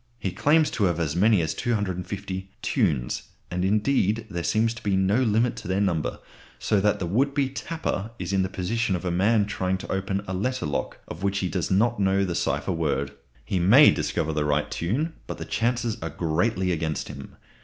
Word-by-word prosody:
He 95 -5 -3
claims 155 - +3
to 105 - +1
have 85 -2 +1
as 80 -2 -1
many 105 +1 +4
as 80 -1 -1
250 95 -3 -3
"tunes"; 80 - 0 0.2
and, 90 +1 -1
indeed, 105 +1 +1
there 85 -2 -3
seems 110 +7 +2
to 115 - -10
be 100 -2 0
no 95 +3 +2
limit 115 -1 +2
to - - -7
their 95 +1 0
number, 90 -6 0 0.4
so 100 - +1
that 105 0 +2
the 90 - -3
would 135 +11 +1
be 140 -3 +1
"tapper" 140 -6 -3
is 90 0 -4
in 95 - +3
the 95 - -1
position 100 +2 -1
of 90 - -5
a 90 - 0
man 100 +4 +3
trying 95 -2 -1
to - - -7
open 95 +1 -1
a 95 - -3
letter 125 +6 -1
lock 75 - -3
of 85 - -8
which 100 0 0
he 95 -2 -1
does 90 -2 -2
not 115 +5 +2
know 95 0 +2
the 90 - -2
cipher 70 0 -1
word. 70 -5 -1 0.3
He 95 - -1
may 115 +12 +8
discover 80 +1 -1
the 75 -1 0
right 75 0 0
tune, 135 - -1
but - - -5
the - - -6
chances 120 -1 0
are 80 - -3
greatly 90 +4 0
against 80 -3 -2
him. - - -9
95 Hz, 210 wpm, -25 LUFS, 85-110 Hz, 0.4 s, may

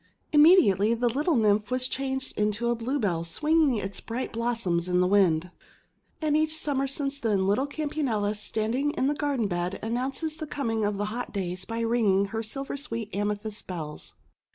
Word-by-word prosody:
Im 295 - +6
mediately 230 - +6
the 240 +1 +1
little 295 +7 +1
Nymph 210 -2 +2
was 255 0 0
changed 265 0 -3
into 210 +3 0
a - - +1
Bluebell 225 - -1
swinging 300 - +2
its 195 -3 -4
bright 235 +3 -4
blossoms 225 -7 0
in 180 0 +2
the 180 - +4
wind. 180 -3 +3 0.7
And 300 -1 +2
each 310 0 +2
Summer 275 -3 0
since 275 +1 -2
then 205 -6 +1
little 210 +8 +2
Campanula, 280 -9 -1
standing 225 +6 -1
in 260 - 0
the 285 - +2
garden 285 -7 0
bed, 175 +1 -2
announces 265 +7 -2
the 310 - -5
com 280 -6 -2
ing 220 -2 0
of 205 -1 -1
the 205 - -1
hot 245 +1 -4
days 185 -2 -3
by 230 +2 -3
ringing 210 -4 +2
her 225 - -1
silver 270 +6 -5
sweet 230 -7 -5
amethyst 205 +1 -3
bells. 160 -5 -7
230 Hz, 180 wpm, -27 LUFS, 205-275 Hz, 0.7 s, Im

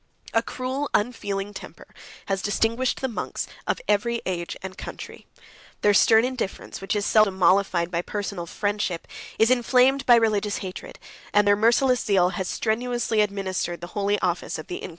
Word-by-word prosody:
A 225 - +4
cruel, 260 +4 -4
unfeeling 205 -3 -2
temper - - -11 0.4
has 195 -1 -1
distinguished 230 +5 0
the 265 - 0
monks 235 - -4 0.2
of - - 0
every 235 +3 +1
age 175 -2 -3
and 190 0 -6
country: - - -9 0.5
their 205 - +4
stern 220 +3 +5
indifference, 255 -8 -5
which 195 - -2
is 205 0 0
seldom 215 -3 +3
mollified 180 -1 +3
by 170 - 0
personal 200 -2 -5
friendship, 205 -3 -2 0.3
is 225 +2 +4
inflamed 255 +2 +3
by 240 - +8
religious 215 -3 +1
hatred; 185 - -8 0.4
and 205 0 +5
their 205 - +6
merciless 240 +4 +3
zeal 185 -3 +3
has 185 0 -4
strenuously 235 +1 0
administered 190 -4 -2
the 175 +1 -9
holy 205 0 +1
office 175 -1 -1
of 155 - -8
the 175 - -5
Inquisition. - - -7
205 Hz, 165 wpm, -24 LUFS, 190-235 Hz, 0.5 s, by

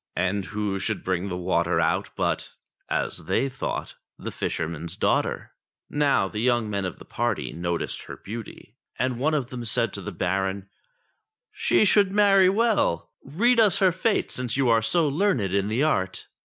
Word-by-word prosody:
And 95 +2 0
who 100 0 -2
should 105 +1 -3
bring 95 +1 -1
the 90 - -3
water 85 -1 +1
out - - +1
but, - - -1 0.4
as - - -2
they 135 - +1
thought, 130 0 -4 0.2
the - - -6
fisherman's 85 +2 -4
daughter. - - 0 0.4
Now 145 -9 +2
the 105 - -5
young 120 -1 +2
men 100 -1 -1
of 90 - -5
the - - -13
party 120 -2 -2
noticed 85 0 -3
her - - -8
beauty, 110 +1 -9 0.2
and 130 -1 -1
one 155 +4 +2
of 130 -5 -2
them 125 -2 -5
said 115 +1 0
to 100 - -6
the 105 - -5
Baron, 95 +2 -1 0.5
" 440 +3 -56
She - - +5
should 200 -1 +4
marry 195 -2 +5
well; 205 - +1
read 235 - +2
us 210 -5 +5
her 190 -2 +4
fate 200 +5 0
since 125 -1 -1
you 135 -3 +2
are 115 -1 +4
so 155 +9 +2
learned 140 - +1
in 100 0 +1
the 115 +7 +1
art." 95 -11 0
115 Hz, 180 wpm, -25 LUFS, 95-155 Hz, 0.5 s, She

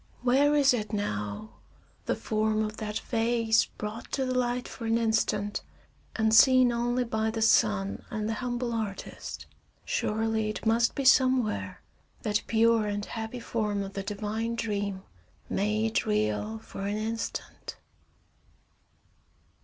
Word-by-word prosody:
Where 280 +4 +4
is 275 -3 +5
it 215 -3 -2
now, 105 - -3 0.5
the - - +1
form 215 0 0
of 215 0 -4
that 210 -1 -3
vase 230 -1 +2
brought 215 +2 -7
to 265 - 0
the 255 - -1
light 245 0 0
for 230 - -6
an 225 +1 +3
instant, 215 -2 0 0.5
and 220 0 +2
seen 255 +2 +7
only 240 +1 0
by 220 -2 -1
the 220 0 -1
sun 210 -3 +2
and 215 -1 -3
the 225 - -1
humble 240 +1 -2
artist? 215 -4 -5 0.4
Surely, 220 0 0
it 215 - -5
must 230 +1 +3
be 275 - -2
somewhere, 255 - +3 0.4
that 210 -1 +1
pure 225 -1 +3
and 205 0 -2
happy 225 +2 -5
form 210 -3 -2
of 195 0 -7
the 195 - -3
divine 215 +3 -3
dream, 205 -4 -2 0.5
made 215 +2 0
real 105 0 0
for 195 - -7
an 205 +1 -1
instant! 225 +1 -5
220 Hz, 135 wpm, -28 LUFS, 210-235 Hz, 0.5 s, seen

